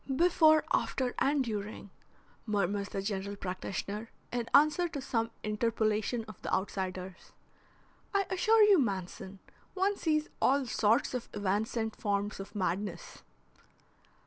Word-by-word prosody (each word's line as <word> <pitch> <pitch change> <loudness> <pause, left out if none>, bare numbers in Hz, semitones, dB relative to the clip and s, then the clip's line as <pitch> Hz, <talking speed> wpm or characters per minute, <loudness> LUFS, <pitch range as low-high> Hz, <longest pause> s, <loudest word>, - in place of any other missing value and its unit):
"Before, 315 -1 +5
after, 255 -2 0
and 280 0 +2
during," 210 -3 -5 0.6
murmurs 200 -1 0
the 195 - -3
general 200 0 -3
practitioner 200 +3 -4 0.2
in 240 -1 -2
answer 305 +4 +5
to 295 - -5
some 230 -3 -1
interpolation 220 +1 0
of 215 - -11
the - - -4
outsider's. 185 -1 -3 0.8
"I 400 -1 +2
assure 440 +3 +5
you, 410 -4 +6
Manson, 195 -4 -3 0.4
one 390 +2 +2
sees 310 -4 0
all 275 +1 +3
sorts 225 0 +2
of 250 -2 -4
evanescent 215 +3 -1
forms 205 0 -2
of 195 +2 -8
madness." 185 -1 -3
215 Hz, 120 wpm, -31 LUFS, 200-275 Hz, 0.8 s, you